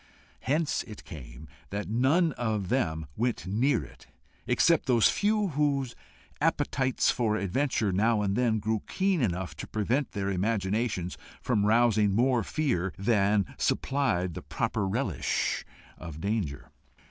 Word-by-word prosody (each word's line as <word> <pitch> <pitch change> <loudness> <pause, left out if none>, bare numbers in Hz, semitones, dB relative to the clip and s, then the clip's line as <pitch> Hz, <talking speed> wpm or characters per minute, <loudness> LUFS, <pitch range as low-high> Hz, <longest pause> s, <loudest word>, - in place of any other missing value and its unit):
Hence 150 +3 0
it 105 -2 -10
came 70 -1 -10 0.2
that 100 +1 -4
none 140 - +3
of 110 -7 -2
them 80 -11 0
went 120 -1 -1
near 110 - +1
it, 65 - -15 0.4
except 150 +7 +3
those 120 -4 +5
few 210 -1 +1
whose 140 -4 0 0.5
appetites 130 -1 +1
for 110 -3 0
adventure 110 +1 0
now 105 +3 +2
and 100 -1 0
then 120 -2 +2
grew 110 +1 -1
keen 190 -4 +1
enough 95 -5 -1
to - - -6
prevent 120 +7 -1
their 100 -1 -1
imaginations 100 -1 -1 0.2
from 105 -4 +1
rousing 110 -3 +3
more 125 +1 +3
fear 100 - -1
than 100 -1 +2
supplied 95 -11 0
the - - -6
proper 100 -3 -2
relish 100 - -1 0.4
of 80 -3 -8
danger. 95 -7 -3
110 Hz, 135 wpm, -28 LUFS, 95-130 Hz, 0.5 s, those